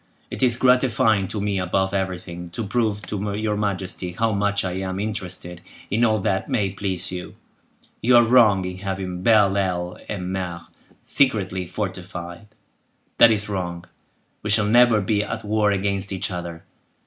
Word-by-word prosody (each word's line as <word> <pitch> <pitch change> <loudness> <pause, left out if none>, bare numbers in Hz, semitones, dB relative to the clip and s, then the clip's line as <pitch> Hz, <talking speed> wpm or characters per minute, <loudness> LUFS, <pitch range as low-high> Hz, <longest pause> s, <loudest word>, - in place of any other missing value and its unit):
It - - -6
is 120 -2 +3
gratifying 120 -6 +3
to 105 - -4
me, 100 -1 -1
above 95 +1 0
everything, 90 -2 -4
to 115 - -3
prove 105 -1 -1
to 105 0 -3
your 105 -1 -1
majesty 95 -3 -3
how 115 +4 +1
much 100 -1 0
I 90 - -1
am 95 0 -3
interested 95 -5 -5 0.3
in 110 +4 +2
all 110 -2 +3
that 95 -2 -1
may 100 -5 0
please 95 -2 -4
you. 90 -1 -7 0.7
You 125 +2 +4
are 120 - +7
wrong 110 -6 +5
in 90 0 -5
having 95 -2 -4
Belle 105 -2 +4
Ile 90 -3 -1
en 90 -3 -4
Mer 90 -3 -4 0.4
secretly 95 -9 +1
fortified. 90 -1 -6 0.7
That 120 - +9
is 105 -2 +1
wrong. 90 -3 -4 0.6
We 105 - -4
shall 105 0 +3
never 115 0 +5
be 105 +2 +1
at 110 0 -5
war 105 0 +2
against 100 0 -1
each 95 0 -3
other. 85 -2 -6
100 Hz, 160 wpm, -23 LUFS, 90-105 Hz, 0.7 s, That